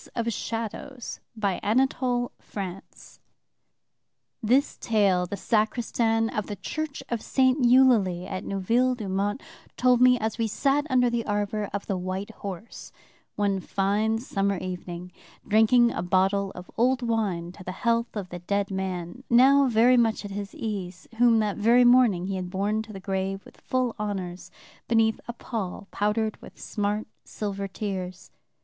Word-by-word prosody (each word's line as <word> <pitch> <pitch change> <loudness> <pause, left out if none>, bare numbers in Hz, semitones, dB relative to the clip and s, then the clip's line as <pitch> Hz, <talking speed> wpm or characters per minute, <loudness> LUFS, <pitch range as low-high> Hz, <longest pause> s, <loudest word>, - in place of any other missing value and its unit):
By 235 - 0
permission 230 0 -2
of 255 +2 -7 0.2
the 215 +4 +2 0.5
publishers. 195 -2 -8 1.2
This 255 +6 +2
tale 195 -5 +2
the 200 - -5
sacristan 225 +1 +1
of 210 -3 -3
the 205 - -4
church 310 - -5
of 235 -2 -2
St. 260 0 +2
Eulalie 240 -8 +4
at 185 0 -5
Neuville 235 +7 +1
d'Aumont 205 +1 -2 0.3
told 250 -1 +4
me, 250 0 +6
as 220 -1 -3
we 225 - +1
sat 280 +7 +1
under 250 -2 +4
the 235 -1 0
arbor 205 0 -1
of 200 0 -4
the 190 -2 -2
White 185 +3 -4
Horse, 200 0 -8 0.4
one 200 -2 +1
fine 205 +4 0
summer 200 -4 -1
evening, 180 -1 -6 0.4
drinking 235 +3 +5
a - - -3
bottle 190 +2 +1
of 180 - -10
old 250 +2 +2
wine 200 -7 -1
to 185 +1 -12
the 185 - -5
health 230 +4 0
of 190 -3 -5
the 175 - -6
dead 200 +3 -1
man, 190 +3 -4
now 270 +3 +6
very 245 +2 +5
much 225 -3 +2
at 200 - -6
his 200 0 -6
ease, 190 -5 -5
whom 240 -2 +6
that 210 -2 0
very 235 +3 +5
morning 240 -8 +5
he 195 0 -2
had 180 -1 -4
borne 205 +3 0
to 220 0 -10
the 195 - -8
grave 195 0 -3
with - - -17
full 255 -2 -1
honors, 190 -4 -4 0.4
beneath 225 -1 +2
a 240 - -4
pall 205 -5 -5
powdered 215 +1 -1
with - - -14
smart 210 0 -2 0.2
silver 200 -2 -4
tears. 190 -2 -5
210 Hz, 155 wpm, -26 LUFS, 195-235 Hz, 1.2 s, me